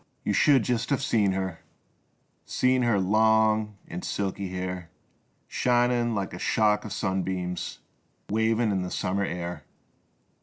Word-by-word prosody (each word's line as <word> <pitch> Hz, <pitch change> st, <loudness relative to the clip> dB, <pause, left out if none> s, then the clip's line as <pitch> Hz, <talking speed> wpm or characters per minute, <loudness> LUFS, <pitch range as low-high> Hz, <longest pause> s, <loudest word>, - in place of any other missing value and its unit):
You -, -, 0 dB
should 140 Hz, -6 st, +5 dB
just 120 Hz, 0 st, -1 dB
have 140 Hz, -2 st, 0 dB
seen 105 Hz, -6 st, +2 dB
her, 95 Hz, -3 st, -3 dB, 0.8 s
Seen 130 Hz, 0 st, +1 dB
her 120 Hz, -5 st, +2 dB
long 110 Hz, +1 st, +3 dB
and 90 Hz, +2 st, -6 dB
silky 100 Hz, -1 st, -3 dB
hair 90 Hz, -2 st, -4 dB, 0.6 s
Shinin' 120 Hz, -1 st, +2 dB
like 100 Hz, -3 st, -3 dB
a 90 Hz, -, -6 dB
shock 105 Hz, +1 st, +2 dB
o' 110 Hz, -, -6 dB
sunbeams 95 Hz, -3 st, -2 dB, 0.5 s
Wavin' 110 Hz, +1 st, +1 dB
in 95 Hz, -2 st, 0 dB
the 90 Hz, -, -3 dB
summer 100 Hz, +1 st, -1 dB
air 90 Hz, -1 st, -5 dB
105 Hz, 130 wpm, -27 LUFS, 95-115 Hz, 0.8 s, should